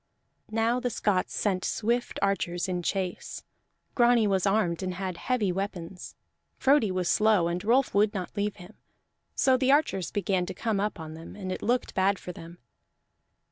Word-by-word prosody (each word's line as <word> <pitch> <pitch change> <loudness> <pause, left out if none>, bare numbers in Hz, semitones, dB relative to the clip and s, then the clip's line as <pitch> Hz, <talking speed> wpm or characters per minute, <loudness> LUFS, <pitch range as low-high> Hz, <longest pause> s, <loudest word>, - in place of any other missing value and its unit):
Now 225 +3 +1
the 250 0 -1
Scots 200 -5 0
sent 190 -3 0
swift 240 +3 -1
archers 180 -3 0
in 180 -1 -2
chase. 185 0 -3 0.5
Grani 240 -2 +4
was 195 -1 +1
armed 195 -4 +1
and 185 -1 -3
had 185 -1 -3
heavy 220 -2 0
weapons; 180 -2 -5 0.4
Frodi 270 -5 +4
was 185 -1 -1
slow 210 -5 +3
and 175 +2 -2
Rolf 250 +5 +2
would 205 +1 +3
not 190 -2 -5
leave 205 0 -1
him; 180 +2 -13 0.6
so 260 -2 +4
the 260 +1 +2
archers 275 - +2
began 190 -3 0
to - - -5
come 220 -4 -1
up 210 -2 -2
on 160 -1 -7
them, 160 +1 -10
and 190 -2 -5
it - - -4
looked 245 +3 0
bad 195 +1 +2
for 180 - -7
them. 170 0 -11
200 Hz, 175 wpm, -28 LUFS, 180-225 Hz, 0.6 s, Grani